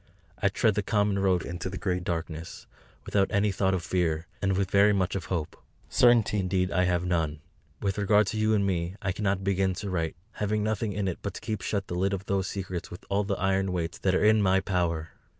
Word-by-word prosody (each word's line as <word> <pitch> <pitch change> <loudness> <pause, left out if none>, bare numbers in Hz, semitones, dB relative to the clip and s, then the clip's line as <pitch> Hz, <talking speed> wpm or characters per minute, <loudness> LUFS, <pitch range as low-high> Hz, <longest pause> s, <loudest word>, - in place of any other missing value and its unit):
I 100 - +4
tread 110 +3 +2
the 105 - 0
common 100 -1 +1
road 95 -3 +2
into 85 +2 -4
the 95 - -5
great 90 -2 -1
darkness, 85 -1 -5 0.4
without 100 -1 +2
any 100 +1 +2
thought 95 0 +1
of 90 - -3
fear, 85 -2 0 0.2
and 95 -1 +1
with 95 -1 -1
very 100 +1 +5
much 95 -2 0
of 95 -2 -3
hope. 85 -5 -3 0.3
Certainty 120 -4 +4
indeed 90 0 0
I 90 -1 +2
have 90 0 +1
none. 80 -4 0 0.4
With 100 +1 0
regard 105 +1 +4
to - - -3
you 110 0 +3
and 100 -1 +2
me 90 -1 -1
I 95 - -1
cannot 95 -1 -1
begin 95 -1 +1
to 100 +1 -5
write; 80 -3 -1 0.2
having 105 -1 -1
nothing 110 0 -1
for 100 0 -1
it 90 - -3
but 100 -2 -4
to - - -7
keep 110 -4 -3
shut 100 +1 -2
the - - -6
lid 95 +3 0
of 95 0 -4
those 95 -1 0
secrets 95 -3 -5
with 90 - -10
all 100 +1 +2
the 100 0 -1
iron 95 0 +1
weights 85 -2 -3
that 95 -1 +1
are 105 - +2
in 110 0 +5
my 95 -1 +4
power. 85 -4 -1
95 Hz, 230 wpm, -28 LUFS, 90-100 Hz, 0.4 s, very